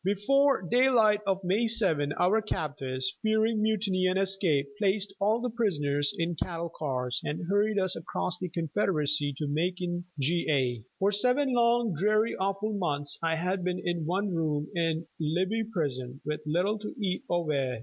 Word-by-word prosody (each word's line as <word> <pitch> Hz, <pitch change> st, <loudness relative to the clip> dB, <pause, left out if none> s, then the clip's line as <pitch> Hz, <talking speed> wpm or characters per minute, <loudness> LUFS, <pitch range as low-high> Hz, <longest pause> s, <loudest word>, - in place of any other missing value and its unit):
Before 265 Hz, +7 st, +2 dB
daylight 225 Hz, -1 st, +4 dB
of 195 Hz, 0 st, 0 dB
May 200 Hz, +6 st, +1 dB
7 180 Hz, -11 st, +2 dB
our 200 Hz, +8 st, +2 dB
captors, 135 Hz, -9 st, -3 dB
fearing 220 Hz, 0 st, +1 dB
mutiny 200 Hz, -4 st, +1 dB
and 185 Hz, +1 st, +1 dB
escape, 190 Hz, -7 st, +2 dB
placed 200 Hz, 0 st, 0 dB
all 215 Hz, +3 st, +2 dB
the 250 Hz, -1 st, -2 dB
prisoners 145 Hz, -11 st, +1 dB
in 170 Hz, 0 st, -1 dB
cattle 170 Hz, +1 st, -4 dB
cars 125 Hz, -4 st, -2 dB
and 155 Hz, +3 st, -4 dB
hurried 205 Hz, +2 st, +1 dB
us 185 Hz, -2 st, +3 dB
across 180 Hz, +2 st, -3 dB
the 180 Hz, -, -4 dB
Confederacy 155 Hz, -3 st, 0 dB
to 150 Hz, -, -2 dB
Macon, 175 Hz, +3 st, -2 dB
Ga. 140 Hz, -5 st, +1 dB, 0.2 s
For 195 Hz, +1 st, +2 dB
seven 250 Hz, +6 st, +2 dB
long, 235 Hz, -3 st, +3 dB
dreary, 215 Hz, +7 st, +1 dB
awful 195 Hz, +3 st, -1 dB
months 145 Hz, -7 st, -2 dB
I 165 Hz, -1 st, +1 dB
had 180 Hz, +3 st, -1 dB
been 180 Hz, 0 st, -1 dB
in 175 Hz, -3 st, -1 dB
one 195 Hz, +4 st, 0 dB
room 150 Hz, -3 st, -1 dB
in 165 Hz, -1 st, -1 dB
Libby 185 Hz, +8 st, 0 dB
Prison, 135 Hz, -, -3 dB
with 150 Hz, +1 st, -3 dB
little 185 Hz, +7 st, +1 dB
to 210 Hz, -, -7 dB
eat 185 Hz, -3 st, -1 dB
or 175 Hz, -1 st, 0 dB
wear. 135 Hz, -5 st, -1 dB
180 Hz, 160 wpm, -28 LUFS, 150-210 Hz, 0.2 s, daylight